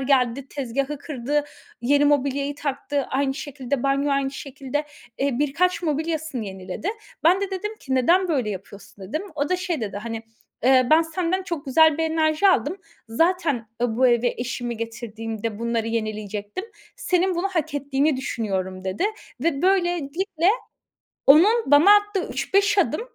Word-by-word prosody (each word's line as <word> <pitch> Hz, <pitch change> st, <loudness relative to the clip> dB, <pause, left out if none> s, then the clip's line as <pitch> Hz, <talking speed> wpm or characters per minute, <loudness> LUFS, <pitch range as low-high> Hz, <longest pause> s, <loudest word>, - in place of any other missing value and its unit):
geldi, 265 Hz, -1 st, +1 dB
tezgâhı 275 Hz, +1 st, -3 dB
kırdı, 290 Hz, 0 st, -2 dB, 0.4 s
yeni 285 Hz, +4 st, +3 dB
mobilyayı 285 Hz, 0 st, +1 dB
taktı; 285 Hz, 0 st, -2 dB
aynı 270 Hz, 0 st, 0 dB
şekilde, 275 Hz, -3 st, -4 dB
banyo, 275 Hz, +1 st, +1 dB
aynı 275 Hz, -1 st, +1 dB
şekilde. 275 Hz, +1 st, -4 dB, 0.3 s
Eee, 275 Hz, -2 st, 0 dB
birkaç 335 Hz, +6 st, +1 dB
mobilyasını 315 Hz, -4 st, -2 dB
yeniledi. 190 Hz, -, -6 dB, 0.4 s
Ben 360 Hz, +4 st, +5 dB
de 400 Hz, -1 st, -2 dB
dedim 420 Hz, +3 st, -4 dB
ki: 265 Hz, -, -3 dB
"Neden 345 Hz, +9 st, +3 dB
böyle 255 Hz, -9 st, 0 dB
yapıyorsun?" 195 Hz, 0 st, -9 dB
dedim. 305 Hz, -, -3 dB
O 290 Hz, 0 st, -1 dB
da 365 Hz, -, +1 dB
şey 350 Hz, -5 st, -2 dB
dedi, 205 Hz, -3 st, -4 dB
hani 225 Hz, +1 st, -5 dB, 0.4 s
eee, 255 Hz, 0 st, +5 dB
"Ben 320 Hz, +1 st, +7 dB
senden 350 Hz, +3 st, -1 dB
çok 335 Hz, -6 st, -5 dB
güzel 315 Hz, +3 st, +5 dB
bir -, -, +1 dB
enerji 320 Hz, +3 st, +2 dB
aldım. 370 Hz, 0 st, +2 dB, 0.3 s
Zaten 305 Hz, -3 st, +1 dB
ı 230 Hz, -2 st, 0 dB
bu 255 Hz, +1 st, +4 dB
eve 240 Hz, 0 st, +2 dB
eşimi 245 Hz, -1 st, -3 dB
getirdiğimde 225 Hz, -1 st, -5 dB
bunları 230 Hz, -1 st, -1 dB
yenileyecektim. 215 Hz, -, -3 dB, 0.3 s
Senin 365 Hz, 0 st, +1 dB
bunu 365 Hz, +3 st, 0 dB
hak 315 Hz, -5 st, -2 dB
ettiğini 285 Hz, +1 st, +1 dB
düşünüyorum." 190 Hz, -7 st, -3 dB
dedi 190 Hz, -, -1 dB, 0.4 s
ve 290 Hz, -1 st, 0 dB
böylelikle 350 Hz, -1 st, +1 dB, 0.8 s
onun 395 Hz, +12 st, +7 dB
bana 335 Hz, +9 st, +8 dB
attığı 410 Hz, -2 st, 0 dB
3, -, -, -4 dB
5 405 Hz, +1 st, +4 dB
adım, 395 Hz, -, +2 dB
280 Hz, 150 wpm, -23 LUFS, 240-330 Hz, 0.8 s, bana